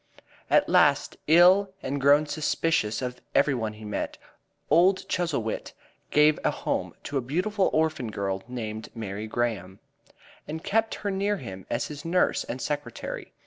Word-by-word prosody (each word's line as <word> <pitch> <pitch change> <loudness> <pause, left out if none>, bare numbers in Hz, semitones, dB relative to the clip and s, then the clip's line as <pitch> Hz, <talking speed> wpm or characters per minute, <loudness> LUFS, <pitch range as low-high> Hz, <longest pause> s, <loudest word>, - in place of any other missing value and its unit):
At - - +4
last, - - +3
ill 185 +4 +6
and 140 +1 -2
grown 145 +2 +5
suspicious 150 -6 0
of 125 0 -5
every 140 0 +4
one 110 -4 -2
he 105 0 -11
met, 105 -1 -3 0.5
old 185 +3 +4
Chuzzlewit 165 -11 -2 0.4
gave 150 +1 +4
a - - +3
home - - -3
to 140 - -2
a - - -3
beautiful 185 - 0
orphan 155 -6 0
girl 95 -2 -3
named 110 -3 -5
Mary 105 -1 -5
Graham, 110 -5 -2 0.7
and 160 +2 -5
kept 225 +2 +1
her 200 - +1
near 200 +2 0
him 95 - -9
as - - -1
his 150 -1 -8
nurse 175 +2 +1
and 125 - -5
secretary. 145 -4 -5
140 Hz, 150 wpm, -26 LUFS, 110-165 Hz, 0.7 s, ill